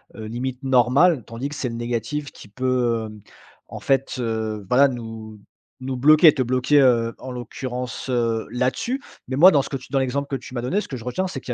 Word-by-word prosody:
heu, 110 - -7
limite 125 +4 -4
normal. 135 - +3
Tandis 115 +4 -5
que 150 - -7
c'est 125 - -3
le 115 - -6
négatif 120 +5 -3
qui 105 - -14
peut, 120 -1 0
hem, 105 -1 -12 0.5
en - - -7
fait, 135 -1 0
heu, 110 -3 -3
voilà 135 +5 +5
nous 115 -3 -8 0.4
nous 130 0 -3
bloquer, 155 +4 +6
te - - -2
bloquer, 130 +3 +3
heu, 115 -3 +3
en 130 - -7
l'occurrence, 125 +1 -6
heu, 115 -2 0
là-dessus. 130 - -1 0.3
Mais 130 - -2
moi 180 +5 +8
dans 145 -5 +4
ce - - -8
que 135 - -3
tu 130 - -14
dans 135 - +2
l'exemple 135 +2 -1
que 140 - -3
tu 130 0 -9
m'as 120 - -3
donné, 185 +12 0
ce - - -10
que 130 - -5
je 115 - -11
retiens 185 +10 -2
c'est 145 - -6
qu'il 125 - -5
125 Hz, 225 wpm, -22 LUFS, 115-135 Hz, 0.5 s, moi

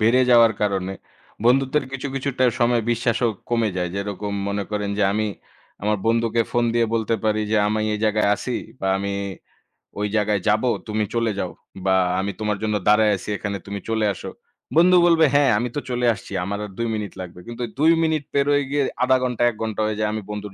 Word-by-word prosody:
বেড়ে 115 +4 +4
যাওয়ার 115 -2 +7
কারণে 95 -2 0 0.5
বন্ধুত্বের 135 +4 +3
কিছু, 135 +1 -4
কিছুটা 135 -1 -2 0.2
সময় 120 -1 +3
বিশ্বাসও 120 0 +1 0.2
কমে 115 -2 +2
যায়। 90 -1 -1
যেরকম 100 +1 -4 0.2
মনে 100 0 -2
করেন 105 -1 -2
যে - - +2
আমি 110 +1 0 0.6
আমার 105 +1 +1
বন্ধুকে 115 0 +2
ফোন 120 0 +2
দিয়ে 120 -1 +3
বলতে 115 0 0
পারি 110 0 +2
যে, 110 - +2
"আমি 110 +1 0
এই - - -3
জায়গায় 105 -1 +2
আছি 125 +4 -4 0.3
বা 95 - -1
আমি 100 0 -3 0.9
ওই 105 - 0
জায়গায় 105 -2 +1
যাবো, 110 +4 +3 0.2
তুমি 110 0 0
চলে 115 -1 +1
যাও। - - -2 0.3
বা 95 0 +3 0.2
আমি 100 +1 -1
তোমার 105 -1 -1
জন্য 105 -1 0
দাঁড়ায় 105 0 +5
আছি 95 - -9
এখানে 100 0 -3
তুমি 100 0 -5
চলে 110 -1 +1
আসো।" - - -8 0.5
বন্ধু 180 +3 +6
বলবে, 165 -2 +5
"হ্যাঁ, 145 -1 +5
আমি 120 +3 -1
তো - - 0
চলে 125 0 0
আসছি। 105 - -12
আমার 100 +2 -3
আর 105 - -10
২ 115 - -1
মিনিট 105 -3 -4
লাগবে।" 90 -1 -9
কিন্তু 120 +1 -5 0.2
২ 160 +2 +5
মিনিট 160 -2 +1
পেরোয় 145 0 +3
গিয়ে 145 0 +1 0.2
১/২ 130 +1 +4
ঘন্টা, 125 -2 -2
১ 120 - -7
ঘন্টা 110 -1 -2
হয়ে 105 -1 -2
যায় 105 0 +1
আমি 110 - -3
বন্ধুর 105 -1 -6
110 Hz, 200 wpm, -22 LUFS, 105-125 Hz, 0.9 s, যাওয়ার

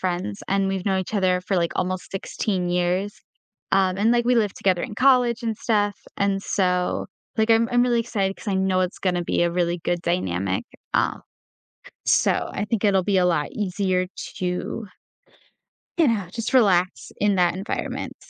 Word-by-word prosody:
friends, 175 - -3
and 195 0 +2
we've 195 -1 -2
known 190 -1 +2
each 190 +3 -6
other 185 -2 +2
for, 190 0 -1
like, 170 -1 +1
almost 185 0 -2
16 190 -1 -2
years, 180 +3 -1 0.5
um, 190 -1 +2
and, 215 +3 +2
like, 240 0 +3
we 250 - +3
lived 215 -4 +1
together 185 -3 +1
in 210 - -5
college 250 -3 +4
and 225 -2 -1
stuff, 205 -3 +1 0.2
and 200 -1 0
so, 180 -2 0 0.3
like, 220 +1 +2
I'm 230 +1 +4
I'm 245 0 +4
really 240 -1 +2
excited 200 -4 -1
'cause - - -8
I 195 - 0
know 190 -1 +1
it's 185 0 -2
gonna 180 -2 0
be 175 - 0
a 170 - +2
really 175 0 0
good 175 0 0
dynamic, 95 - -1 0.3
uh, - - +1 0.9
so - - +2
I 205 - -2
think 220 0 -2
it'll 195 -2 +3
be 195 0 +1
a 180 - +4
lot 165 -5 +1
easier 185 -2 0 0.3
to 180 +4 -3 1.1
you 325 -4 +5
know, 210 -5 0
just 230 +5 -4
relax 185 -6 +3
in 205 -2 +3
that 175 -1 +3
environment. 195 +4 -4
190 Hz, 180 wpm, -23 LUFS, 180-215 Hz, 1.1 s, you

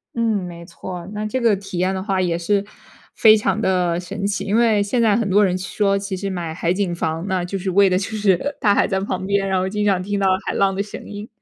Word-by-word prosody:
嗯， 235 - -1 0.3
没 170 -1 -9
错 180 +2 -8
儿。 170 - -10
那 210 0 -3
这 215 +5 -2
个 230 -4 +3
体 195 -2 -7
验 185 +2 +1
的 190 - -3
话 195 -1 -1
也 170 -2 0
是 200 +3 0 0.5
非 220 -1 +7
常 215 +1 0
的 180 -3 +1
神 185 +2 -5
奇， 200 0 -1
因 205 +2 0
为 225 -3 +3
现 235 +4 0
在 220 -3 +4
很 225 -2 0
多 205 +2 +4
人 180 0 0
说， 195 +1 0
其 195 0 -4
实 195 +1 -3
买 175 -4 -4
海 170 +2 0
景 185 -3 -1
房 165 +2 -3
呢， 185 -2 -1
就 195 +2 -4
是 190 +1 -3
为 195 +1 +4
了 185 - +2
就 200 +3 -3
是 210 +6 +1
大 205 -3 +3
海 - - +2
在 190 -1 0
旁 190 -1 -3
边， 200 0 0
然 190 -1 +1
后 185 - -1
经 210 +1 -1
常 195 -3 +2
听 200 +2 -2
到 195 - +2 0.2
海 - - -2
浪 195 -1 +2
的 200 - -1
声 205 +2 -8
音。 205 +1 -7
195 Hz, 290 characters per minute, -21 LUFS, 185-205 Hz, 0.5 s, 非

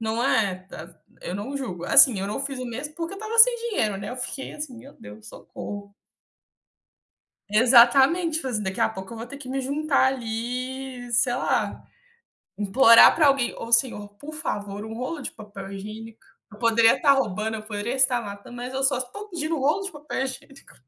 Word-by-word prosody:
Não 225 +1 -2
é? 225 -9 +2
Tá 165 -2 -10
c - - -20 0.3
eu 180 - -5
não 245 +8 -5
julgo. 185 -11 -5
Assim, 240 -8 +6
eu 195 - -3
não 210 - -4
fiz 275 -2 -5
o - - -4
mesmo, 265 +6 -6
porque 335 +3 -5
eu - - -10
estava 435 +1 -5
sem - - +9 0.2
dinheiro, 215 - 0
né. 200 +3 -6
Eu 250 - -6
fiquei, 265 +2 -6
assim: 295 -5 -7
“Meu 270 +4 -13
Deus, 105 +1 -13
socorro!”. 200 -1 -9 1.6
Exatamente, 265 +8 +5
falei 260 -6 -5
assim: 210 - -3
"Daqui 190 0 -4
a - - +4
pouco 190 +1 -8
eu - - -8
vou 230 - -6
ter 280 +3 -10
que 260 -2 -10
me 270 +1 -2
juntar 280 +1 0
ali, 250 +2 -5
sei 245 +1 +2
lá, 255 - -1 0.8
implorar 230 +3 +7
pra 310 -3 +4
alguém: 270 -3 +1
'Ô 230 - -7
senhor, 235 -4 +2
por 305 +2 -9
favor, 205 -9 -5
um 220 - -8
rolo 255 +6 -5
de - - -5
papel 200 -2 -10
higiênico'. 215 +3 -9 0.3
Eu 210 - -14
poderia 230 0 +4
tá 285 -4 +5
roubando, 220 -4 -1
eu 215 - -8
poderia 215 +2 -4
estar 260 -2 +2
matando, 205 +3 -9
mas 245 +1 -6
eu 270 - -2
só 270 -1 +2
estou 410 +12 -7
pedindo 325 -3 -3
um - - -4
rolo 300 +9 +1
de 390 - -6
papel 295 -3 -5
higiênico." 275 +1 -10
245 Hz, 200 wpm, -24 LUFS, 215-275 Hz, 1.6 s, sem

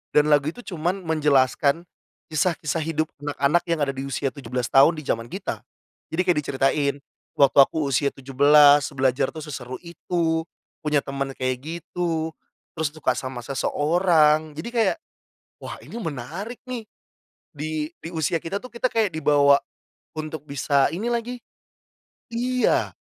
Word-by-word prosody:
dan 150 0 +5
lagu 145 0 +4
itu 245 +10 -5
cuman 180 0 -2
menjelaskan 150 -1 +2 0.5
kisah-kisah 155 -1 0
hidup 155 0 -1
anak-anak 145 +3 +1
yang 165 -1 0
ada 140 - 0
di 135 0 -6
usia 135 0 -2
17 125 -3 -4
tahun 140 +5 +6
di 155 - -7
zaman 115 -3 -2
kita. 190 +8 -5 0.5
Jadi 160 +3 +1
kayak 180 -3 +2
diceritain, 140 0 +1 0.4
waktu 140 -1 +4
aku 150 +3 +5
usia 140 +1 +1
17, 145 +2 +5
belajar 130 0 +2
tuh, 155 -1 -8
seseru 130 -4 -6
itu, 170 -1 -1 0.4
punya 150 -1 +2
teman 140 -1 -3
kayak 130 -1 -1
gitu, 165 0 -3 0.4
terus 160 -2 -1
suka 150 -4 0
sama 130 -1 -5
seseorang. 155 +3 +2
Jadi 160 +9 -5
kayak, 230 0 +2 0.7
wah - - -6
ini - - -10
menarik 170 - -5
nih. 245 -3 -5 0.7
Di 155 +1 -3
di 165 - -6
usia 160 +1 0
kita 195 +4 -3
tuh, 255 - -10
kita 235 +2 -1
kayak 220 -3 +1
dibawa 145 -2 +5 0.6
untuk 155 0 -5
bisa 140 -1 +2
ini 205 +7 -3
lagi 240 +1 -2 0.9
iya. 250 +2 +1
155 Hz, 145 wpm, -24 LUFS, 140-170 Hz, 0.9 s, tahun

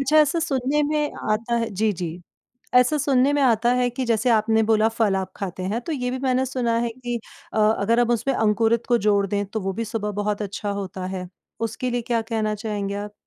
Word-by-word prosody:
अच्छा, 275 +3 +2
ऐसा 310 +2 +4
सुनने 285 -1 0
में 300 0 0 0.2
आता 230 +3 0
है 230 -1 0
जी, 210 +2 +1
जी। 175 -1 -5 0.5
ऐसा 250 +5 +5
सुनने 275 0 +3
में 290 - +1
आता 235 -1 +3
है 250 0 +2
कि 255 +2 -3
जैसे 235 +1 +1
आपने 220 0 +3
बोला 220 0 +3
फल 225 -3 +1
आप 190 -1 -3
खाते 185 -2 -5
हैं 230 - -1
तो 320 +7 -5
ये 250 -3 -2
भी 260 - -3
मैंने 260 -1 +1
सुना 240 -3 0
है 235 0 0
कि 240 0 -4 0.4
अ, - - 0
अगर 220 +2 +3
हम 240 0 +2
उसमें 260 +3 0
अंकुरित 225 +2 +2
को 240 -1 +3
जोड़ 200 -1 +3
दें 205 +1 -1
तो 220 +2 -4
वो 195 0 -2
भी 230 +4 -3
सुबह 215 -1 -3
बहुत 210 0 -1
अच्छा 205 +1 -4
होता 190 -2 -4
है। 185 -1 -5 0.4
उसके 255 +2 -4
लिए 245 0 -1
क्या 230 -1 0
कहना 220 -2 -1
चाहेंगे 205 -2 -3
आप? 205 +1 -5
225 Hz, 225 wpm, -23 LUFS, 205-250 Hz, 0.5 s, ऐसा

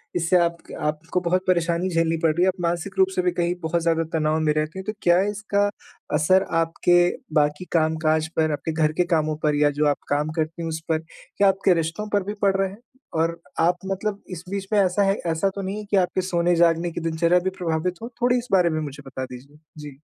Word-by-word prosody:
इससे 175 +1 +3
आपक 170 -1 -2
आपको 155 +4 -1
बहुत 180 +1 +1
परेशानी 175 0 +1
झेलनी 165 -1 +1
पड़ 160 - +4
रही 175 +3 +1
है, - - +4
आप 185 -1 -1
मानसिक 170 -1 -2
रूप 380 -1 +5
से 370 - +2
भी 360 -1 +1
कहीं 175 - -1
बहुत 165 +1 0
ज़्यादा 165 0 +1
तनाव 155 -1 +1
में 155 -1 +2
रहती 155 +4 -2
हैं, - - -5
तो 215 - -3
क्या 175 +1 +4
इसका 205 -1 0 0.5
असर 185 +5 +4 0.2
आपके 165 +2 +2 0.4
बाकी 150 +3 +2
काम 160 -1 +2
काज 155 0 +2
पर, 155 -1 +2
आपके 150 +2 -3
घर 155 -1 +1
के - - +5
कामों 155 -1 0
पर 150 -1 +2
या 145 0 +4
जो 150 - +3
आप 145 - +2
काम 145 +2 0
करती 160 +1 -2
हैं, 165 - -3
उस 160 0 -3
पर, 160 -1 +2 0.4
क्या 200 - +5
आपके 195 -1 +3
रिश्तों 165 +5 -2
पर 205 -2 +2
भी 205 - -4
पड़ 195 -1 +3
रहे 195 0 +1
हैं 195 - -12 0.4
और 165 +1 -1 0.2
आप 175 +2 +3
मतलब 200 +1 -3
इस 180 -1 -6
बीच 195 -1 -4
में 205 - +4
ऐसा 190 +1 +2
है 195 0 +3
ऐसा 165 +4 +1
तो 200 - -3
नहीं 195 +2 -4
है 215 - -5
कि 200 - +4
आपके 185 0 +1
सोने-जागने 170 -1 +2
की 170 - -5
दिनचर्या 165 +2 +2
भी 190 +1 -1
प्रभावित 175 0 -1
हो? 230 - -6
थोड़ी 245 +1 +3
इस 245 - -4
बारे 180 -3 +4
में 155 -1 -1
मुझे 145 -1 -7
बता 130 0 -5
दीजिए। 130 +4 -12 0.2
जी। 145 -3 -9
170 Hz, 235 wpm, -23 LUFS, 155-190 Hz, 0.5 s, रूप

